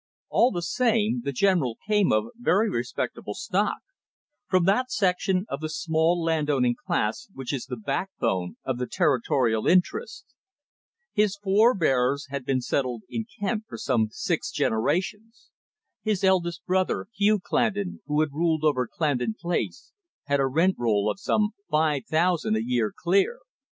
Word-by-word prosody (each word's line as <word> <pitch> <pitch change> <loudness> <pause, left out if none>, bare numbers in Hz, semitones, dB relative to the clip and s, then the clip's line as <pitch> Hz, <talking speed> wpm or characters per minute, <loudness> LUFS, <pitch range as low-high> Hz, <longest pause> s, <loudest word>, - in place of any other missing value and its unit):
All 240 - +4
the 175 -7 -4
same, 230 +4 +1
the - - -2
General 150 -6 +1
came 210 -3 +3
of 110 +1 +1
very 225 -2 +2
respectable - - -3
stock, - - -1 0.7
from 185 -2 +2
that 250 +7 +2
section 190 -2 +1
of 140 - -4
the 155 0 -4
small 160 +2 +1
landowning 150 -6 +1
class 110 - -1
which 135 +1 -5
is 130 -3 -4
the 125 -2 -5
backbone 95 - -2
of 130 -2 -2
the 125 - -2
territorial 115 -3 +1
interest. 395 - +1 0.9
His 210 -2 +2
forbears 180 - +2
had 140 -2 -4
been 130 -1 0
settled 125 -3 -2
in 225 - -3
Kent 210 +2 -1
for - - -7
some 115 -5 +1
six - - -2
generations. 185 - -2 0.5
His 215 -4 -1
eldest 175 -3 +1
brother, 185 0 0
Hugh 210 0 +3
Clandon, 195 0 -1
who 150 0 +2
had 155 -2 -1
ruled 160 0 0
over 130 -5 +2
Clandon 125 -8 -1
Place, 175 0 -3 0.3
had 140 0 0
a 135 - +2
rent 165 +8 +2
roll 105 -3 +2
of - - -8
some 210 +1 +1 0.2
five 150 -3 +1
thousand 165 -8 +1
a 110 - -1
year 120 -3 0
clear. 195 - +1
165 Hz, 150 wpm, -26 LUFS, 130-200 Hz, 0.9 s, All